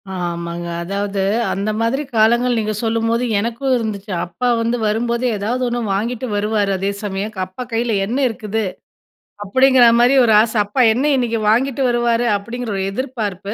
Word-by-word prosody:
ஆமாங்க. 170 -1 -4 0.2
அதாவது 200 +2 -3 0.3
அந்த 200 +2 -2
மாதிரி 250 +6 0
காலங்கள் 240 +3 +3
நீங்க 215 0 -2
சொல்லும்போது, 230 +1 0 0.2
எனக்கும் 235 +5 -1
இருந்துச்சு. 215 -3 -4
அப்பா 180 +9 -3
வந்து 230 +1 0
வரும்போதே, 235 +3 0
ஏதாவது 235 +6 -2
ஒண்ணு 240 0 -2 0.2
வாங்கிட்டு 235 +4 -3
வருவாரு. 205 -1 0
அதே 195 +2 -1
சமயம், 205 +1 -4
க - - -7
அப்பா 190 +7 -7
கையில 230 -1 0
என்ன 235 +6 -2
இருக்குது, 220 0 -3 0.8
அப்படிங்கிற 260 +4 +4
மாரி 245 +3 +4
ஒரு 220 - +4
ஆச. 225 0 -1
அப்பா 205 +6 0
என்ன 255 +5 -1
இன்னைக்கு 235 -3 0
வாங்கிட்டு 260 +4 +1
வருவாரு? 240 0 +1
அப்படிங்கிற 235 +3 -6
ஒரு 190 - -1
எதிர்பார்ப்பு. 210 -5 -4
225 Hz, 155 wpm, -18 LUFS, 205-245 Hz, 0.8 s, அப்படிங்கிற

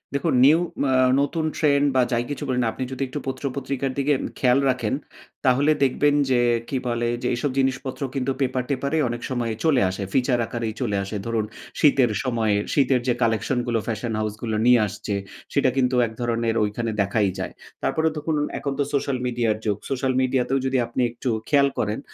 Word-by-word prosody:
দেখুন, 140 - +1
নিউ 155 +4 +6 0.2
মা 135 - +1 0.3
নতুন 155 +3 -1
ট্রেন্ড 145 -2 +3
বা 130 - +5
যাই 120 0 +1
কিছু 145 - -4
বলি 125 -1 0
না, - - +1
আপনি - - -4
যদি 130 +1 -3
একটু 135 +3 -5
পত্র-পত্রিকার 135 0 -3
দিকে 140 +2 +1
উম - - -3
খেয়াল 125 0 +4
রাখেন, 120 -4 0 0.5
তাহলে 135 +4 +4
দেখবেন 145 +2 +3
যে 125 -2 +3 0.3
কি 135 - -1
বলে? 120 0 0
যে, 125 - -1
এসব 135 +3 -1
জিনিসপত্র 130 0 -1
কিন্তু 135 0 0
পেপার-টেপারে 135 +3 -1
অনেক 120 0 -4
সময় 120 -3 -1
চলে 150 -6 +3
আসে। 95 +2 -4
ফিচার 125 -1 +2
আকারেই 115 -2 -3
চলে 105 -5 0
আসে 100 +2 -4
ধরুন, 115 -2 0 0.3
শীতের 135 -5 +4
সময় 115 -5 +1 0.2
শীতের 135 -3 +3
যে 125 - +3
কালেকশন 115 +3 +1
গুলো 115 -1 +1
ফ্যাশন 115 +1 -2
হাউস 110 -1 -1
গুলো 110 -2 -2
নিয়ে 125 -1 +6
আসছে, 100 +1 -4 0.4
সেটা 140 -2 +3
কিন্তু 130 -1 +2
এক - - -9
ধরণের 115 -1 0
ঐখানে 110 +2 -2
দেখাই 100 0 +1
যায়। - - -4 0.3
তারপরে 160 0 +1
দেখুন, 155 +1 -1 0.2
এখন 140 - -2
তো - - +4
সোশ্যাল 140 -1 0
মিডিয়ার 120 -3 0
যুগ। 105 -2 +1
সোশ্যাল 130 -1 0
মিডিয়া 130 0 +2
তেও 135 +1 +2
যদি 130 0 +1
আপনি 120 +2 -2
একটু 120 +2 -4 0.2
খেয়াল 140 -2 +5
করেন, 105 +1 -1
125 Hz, 190 wpm, -23 LUFS, 115-135 Hz, 0.5 s, নিউ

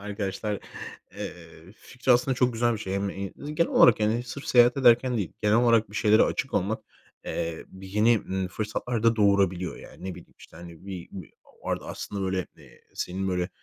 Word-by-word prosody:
arkadaşlar, 105 0 -4 0.6
eee, 85 +1 -9
fikri 130 0 0
aslında 125 +2 +2
çok 125 0 +2
güzel 120 +1 +1
bir 110 - -3
şey. 95 -2 -4
Hem 100 0 -1 0.5
genel 170 +2 +1
olarak, 115 - +6
yani, 110 +3 +1
sırf 130 +4 -8
seyahat 120 0 +5
ederken 125 -1 +4
değil 100 -7 -3
genel 105 +1 +4
olarak 115 -3 +3
bir 105 - -8
şeylere 110 +1 +5
açık - - -1
olmak, - - 0 0.4
eee, 80 -1 -4
bir 95 0 -12
yeni, 105 +4 +4
ımm, 95 -2 -3
fırsatlar 110 +3 -3
da 115 0 +3
doğurabiliyor. 100 -4 +2
Yani, - - -13
ne 95 -1 -4
bileyim, - - -15
işte, - - -15
hani, 85 +2 -12
bi 90 -3 -7
bir 90 -7 -9 0.3
bu - - -4
arada - - -3
aslında, 100 -1 -5
böyle, 95 -1 -1
eee, - - -18
senin 95 +2 -3
böyle 90 -1 -1
105 Hz, 190 wpm, -26 LUFS, 95-120 Hz, 0.6 s, olarak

